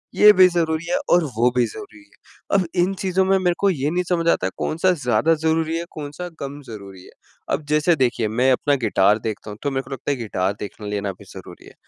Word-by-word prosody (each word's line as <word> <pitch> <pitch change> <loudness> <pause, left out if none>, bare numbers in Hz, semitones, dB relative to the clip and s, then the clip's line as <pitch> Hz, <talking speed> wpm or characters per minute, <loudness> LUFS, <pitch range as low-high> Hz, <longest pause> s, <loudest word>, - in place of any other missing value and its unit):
ये 210 0 +8
भी 185 -1 +7
ज़रूरी 165 -2 -1
है 270 - +2
और 175 -1 +4
वो 120 +2 +4
भी 125 - +3
ज़रूरी 105 0 -11
है। 100 - -5
अब 190 - +1 0.2
इन 190 +2 +1
चीज़ों 190 0 +1
में 195 0 +3
मेरे 180 -2 +1
को 200 - +3
ये 145 -5 -1
नहीं 180 +2 0
समझ 170 -2 0
आता 95 - +2
है - - -5
कौन-सा 165 +4 +1
ज़्यादा 155 0 +1
ज़रूरी 160 +1 0
है, 170 - -4
कौन-सा 150 +4 -7
कम 140 +1 -6
ज़रूरी 100 -4 -10
है? - - -15 0.5
अब 150 - -8
जैसे 150 +3 +3
देखिए 120 -5 0
मैं 125 +5 +2
अपना 140 +3 +2
गिटार 105 0 +3
देखता 110 -1 -5
हूँ 105 - -9
तो 145 - -1
मेरे 135 0 -2
को 130 - -15
लगता 135 +2 -3
है 140 - -1
गिटार 100 -4 -2
देखने 105 0 -7
लेना 100 -1 -2
भी - - -14
ज़रूरी - - -12
है - - -15
145 Hz, 235 wpm, -21 LUFS, 110-175 Hz, 0.5 s, ये